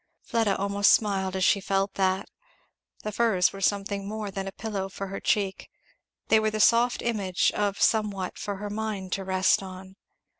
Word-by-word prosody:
Fleda 225 -5 +1
almost 200 0 +3
smiled 195 -3 +1
as 190 - 0
she 200 - +4
felt 195 0 0
that. 190 0 0 0.8
The 215 - -3
furs 205 -5 +2
were 195 - -8
something 200 0 -1
more 210 -1 -4
than 195 0 -4
a - - -4
pillow 195 -2 -4
for 195 0 -6
her 195 - -5
cheek 195 -2 -1 0.6
they 220 - +5
were 215 0 +1
the 215 0 -4
soft 235 +3 +4
image 200 -6 +1
of 205 -1 -1
somewhat 205 -4 0
for 205 - -3
her 205 +1 -6
mind 210 -3 -4
to 195 - -2
rest 190 0 +2
on. 190 0 -10
200 Hz, 180 wpm, -26 LUFS, 190-215 Hz, 0.8 s, they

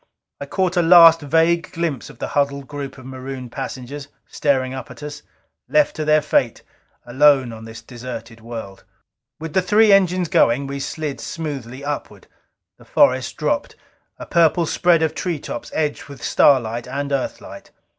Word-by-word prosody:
I 140 - -6
caught 185 +2 -1
a - - +5
last 165 -1 +8
vague 165 +4 +1
glimpse 165 -7 -3
of 140 - -14
the - - -5
huddled 140 -1 -1
group 140 -1 -7
of 130 - -13
marooned 130 -1 -7
passengers, 135 +1 -6 0.2
staring 130 -3 0
up 130 -3 -7
at 125 +3 -12
us. 150 0 -7 0.5
Left 300 -1 +2
to 155 - -3
their 155 0 +3
fate, 125 -5 0 0.4
alone 130 -1 +3
on 110 0 -10
this 115 0 -10
deserted 120 -2 -9
world. 110 -4 -8 0.6
With 160 -1 -7
the 190 - +3
three 210 +3 +4
engines 185 -2 +3
going, 140 -6 +2
we 140 0 -5
slid 145 -1 -4
smoothly 140 -5 -6
upward. 145 0 -5 0.5
The - - -17
forest - - +2
dropped, - - -1 0.4
a - - -8
purple 170 0 +3
spread 170 0 +2
of 160 - 0
treetops 160 -9 -5
edged 150 -2 -1
with 140 -3 -12
starlight 120 -4 +2
and 140 +2 -4
Earthlight. 135 -2 -5
140 Hz, 160 wpm, -20 LUFS, 130-165 Hz, 0.6 s, last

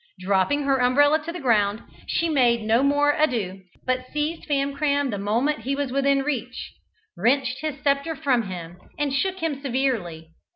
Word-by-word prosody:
Dropping 195 +10 +1
her 275 -1 +2
umbrella 290 +5 +4
upon 320 +2 -6
the - - -4
ground, 215 -5 +1 0.2
she 335 - 0
made 245 -7 +2
no 225 +3 +3
more 290 +1 +3
ado, 225 -11 -1 0.2
but 255 0 -1
seized 300 +3 -3
Famcram 285 -1 0
the 205 - -3
moment 235 +9 0
he 265 +5 -2
was 280 -2 -2
within 275 0 +2
reach, 250 -4 -4 0.4
wrenched 255 +1 +1
his 310 -2 -3
sceptre 280 +3 +1
from 265 -8 0
him, 175 -1 -7 0.2
and 290 -2 -1
shook 375 +6 -1
him 290 -4 -2
severely. 235 - -2
270 Hz, 165 wpm, -24 LUFS, 230-290 Hz, 0.4 s, umbrella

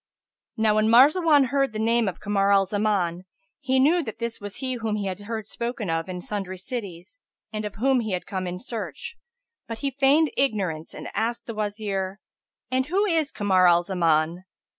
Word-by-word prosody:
Now 220 -1 +3
when 215 +1 +3
Marzawan 285 +3 +6
heard 275 -2 +1
the - - -4
name 230 +1 +2
of 190 - -4
Kamar 200 -1 +1
al 195 -1 +5
Zaman, 190 -3 -1 0.3
he 265 -2 +1
knew 320 +7 +4
that 220 -9 -6
this 235 -2 -4
was 205 -1 -7
he 260 -1 -3
whom 225 -3 -2
he 205 -1 -2
had 190 0 -3
heard 220 +1 -5
spoken 235 -3 -3
of 165 +2 -2
in 180 -1 -5
sundry 190 -1 -4
cities 195 - -7 0.3
and 215 0 -3
of 205 -1 -6
whom 260 +4 +2
he 210 -6 -1
came 185 -1 -5
in 180 0 -4
search, 230 - -6 0.5
but 230 - -5
he 275 - +1
feigned 285 +4 +3
ignorance 190 - -1
and - - -7
asked 230 +2 -2
the 230 - -5
Wazir, 205 -2 -3 0.5
"And 260 +1 +1
who 390 +6 +2
is 325 -6 +1
Kamar 190 -3 +3
al 175 0 +5
Zaman? 170 -1 +1
215 Hz, 185 wpm, -25 LUFS, 190-255 Hz, 0.5 s, Marzawan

